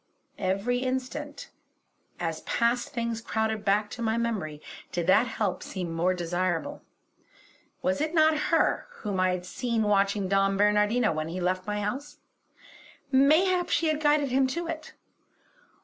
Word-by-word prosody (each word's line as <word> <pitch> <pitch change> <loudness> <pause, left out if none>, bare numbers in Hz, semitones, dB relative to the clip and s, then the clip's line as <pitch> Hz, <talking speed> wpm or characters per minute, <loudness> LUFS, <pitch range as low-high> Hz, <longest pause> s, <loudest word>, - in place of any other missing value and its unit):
Every 200 +7 0
instant, 260 +3 -4 0.7
as 165 -2 -3
past 235 +1 0
things 230 -1 -3
crowded 220 -1 -1
back 210 +1 +2
to 240 - -7
my 225 0 0
memory, 205 -11 -2 0.3
did 175 -1 -2
that 205 +7 +4
help 200 -5 -2
seem 180 -4 -5
more 175 +3 +1
desirable. 175 0 -2 1.0
Was 280 +1 +1
it 310 +2 -1
not 315 0 +5
her 330 +7 +2 0.2
whom 200 -3 -2
I 185 0 +3
had 180 -1 -2
seen 235 +3 -1
watching 200 -1 +2
Don 195 0 +2
Bernardino 210 +3 +3
when 155 0 -2
he 175 +3 -4
left 185 +1 -1
my 210 0 -1
house; 255 +8 -4 0.9
mayhap 330 +7 +4
she 325 - +2
had 310 0 -1
guided 295 -2 +3
him 265 +1 +3
to 340 +6 -3
it. 320 -1 -6
220 Hz, 150 wpm, -27 LUFS, 185-265 Hz, 1.0 s, not